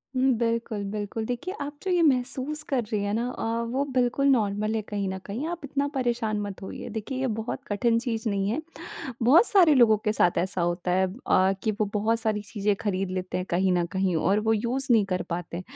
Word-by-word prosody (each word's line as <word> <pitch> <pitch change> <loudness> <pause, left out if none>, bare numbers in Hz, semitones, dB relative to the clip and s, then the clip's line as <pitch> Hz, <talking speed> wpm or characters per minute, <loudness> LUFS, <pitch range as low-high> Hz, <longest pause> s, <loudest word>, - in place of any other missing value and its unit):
हुँ, 260 +1 +3
बिल्कुल, 230 -2 -1
बिल्कुल। 210 +1 -3
देखिए, 245 - -4
आप 290 +1 -5
जो 380 - -1
ये 355 -1 +3
महसूस 270 +1 +1
कर 270 -5 -1
रही 210 -2 0
हैं 205 - -1
ना 235 +3 0
अ, - - -6 0.3
वो 265 +4 0
बिल्कुल 255 +2 +2
नॉर्मल 215 -4 +1
है 220 - 0
कहीं 200 -1 -3
न 190 - -3
कहीं। 235 +10 -4
आप 345 0 -4
इतना 280 +1 -1
परेशान 235 -4 0
मत 200 -2 -6
होइए। 190 - -7
देखिए, 230 +4 -5
ये 265 - 0
बहुत 225 - -4
कठिन 230 +3 +1
चीज़ 230 -2 -3
नहीं 195 0 0
है। 240 +9 -1 0.6
बहुत 290 - +6
सारे 350 -7 +5
लोगों 235 -5 +6
के 215 - +2
साथ 175 -4 +3
ऐसा 190 +1 -1
होता 175 +1 -1
है 190 +1 +3 0.2
अ, 190 +1 +4
कि 220 - +1
वो 215 - +4
बहुत 225 +2 +1
सारी 215 -2 -1
चीज़ें 205 0 -1
खरीद 195 -3 -1
लेते 185 -1 -3
हैं 180 0 -3
कहीं 185 +2 +2
न 175 -1 +2
कहीं, 190 -1 +1
और 195 +6 +2
वो 220 +1 +1
यूज़ 240 +5 -1
नहीं 225 -4 +5
कर 180 - -1
पाते। 175 0 -4
220 Hz, 220 wpm, -26 LUFS, 195-255 Hz, 0.6 s, बहुत